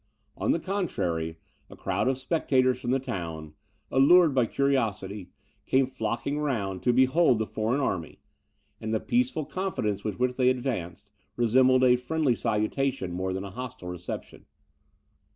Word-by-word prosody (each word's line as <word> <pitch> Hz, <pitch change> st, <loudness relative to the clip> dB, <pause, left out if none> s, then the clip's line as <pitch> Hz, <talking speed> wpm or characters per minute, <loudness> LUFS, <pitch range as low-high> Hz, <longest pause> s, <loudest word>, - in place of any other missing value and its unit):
On -, -, 0 dB
the -, -, +1 dB
contrary, 85 Hz, -, -2 dB, 0.3 s
a -, -, -11 dB
crowd -, -, -1 dB
of 130 Hz, -1 st, +1 dB
spectators 130 Hz, -3 st, +1 dB
from 120 Hz, -, -4 dB
the 130 Hz, -, +3 dB
town, 85 Hz, -, -5 dB, 0.4 s
allured 155 Hz, +4 st, +6 dB
by 125 Hz, -3 st, +2 dB
curiosity, 105 Hz, -9 st, -1 dB, 0.4 s
came 135 Hz, 0 st, +3 dB
flocking 125 Hz, +3 st, -3 dB
round, 105 Hz, -11 st, -2 dB
to 125 Hz, -, +3 dB
behold 130 Hz, +2 st, +4 dB
the 110 Hz, -, -1 dB
foreign 110 Hz, +6 st, -1 dB
army; 90 Hz, -, -2 dB, 0.6 s
and 110 Hz, 0 st, -2 dB
the -, -, +1 dB
peaceful 245 Hz, -, 0 dB
confidence 145 Hz, -, -2 dB
with 105 Hz, -3 st, -3 dB
which 125 Hz, 0 st, 0 dB
they 130 Hz, -1 st, +4 dB
advanced, 105 Hz, -, -3 dB, 0.2 s
resembled 130 Hz, +2 st, +4 dB
a 125 Hz, -1 st, +5 dB
friendly 135 Hz, 0 st, 0 dB
salutation, 110 Hz, -1 st, -1 dB
more 95 Hz, +2 st, -2 dB
than 95 Hz, +1 st, -3 dB
a 100 Hz, -, -7 dB
hostile 115 Hz, -5 st, -7 dB
reception. 90 Hz, 0 st, -7 dB
125 Hz, 150 wpm, -27 LUFS, 100-135 Hz, 0.6 s, allured